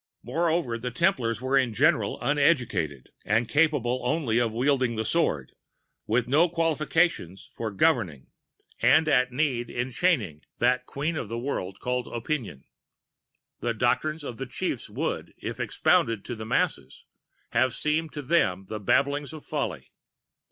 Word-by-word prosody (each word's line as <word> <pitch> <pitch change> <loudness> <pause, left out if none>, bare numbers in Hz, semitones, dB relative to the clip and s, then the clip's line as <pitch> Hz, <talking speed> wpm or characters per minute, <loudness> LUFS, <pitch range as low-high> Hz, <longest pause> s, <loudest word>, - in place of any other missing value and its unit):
Moreover, 165 -8 0
the 125 +2 -3
Templars 125 - 0
were 135 +1 +3
in 120 -4 -1
general - - +2
uneducated, 120 - +1
and 115 +3 +1
capable 145 -4 +2
only 125 -3 +1
of 120 -2 +1
wielding 125 0 +1
the 110 0 -2
sword, 110 - 0 0.6
with 115 +2 +1
no 155 +7 +4
qualifications 165 - 0
for 115 - -3
governing, 100 - 0 0.5
and 160 - +5
at 125 -4 +3
need 125 -3 0
enchaining, 120 - 0 0.2
that 125 +1 +1
queen 150 +4 -2
of 110 - -4
the 115 - -3
world 110 -7 -3
called 125 0 -2
Opinion." 120 - -4 1.0
[The 120 -1 -1
doctrines 155 +7 0
of 125 -5 -6
the 135 - -5
Chiefs - - -4
would, - - -3
if - - -6
expounded 115 -3 +1
to 120 - -4
the 110 0 -7
masses, 70 -10 -1 0.5
have 130 -1 +2
seemed 155 +1 0
to 145 - -5
them 95 - +2
the 110 - -4
babblings 140 +7 +1
of 155 - -10
folly. - - -4
125 Hz, 145 wpm, -26 LUFS, 115-150 Hz, 1.0 s, and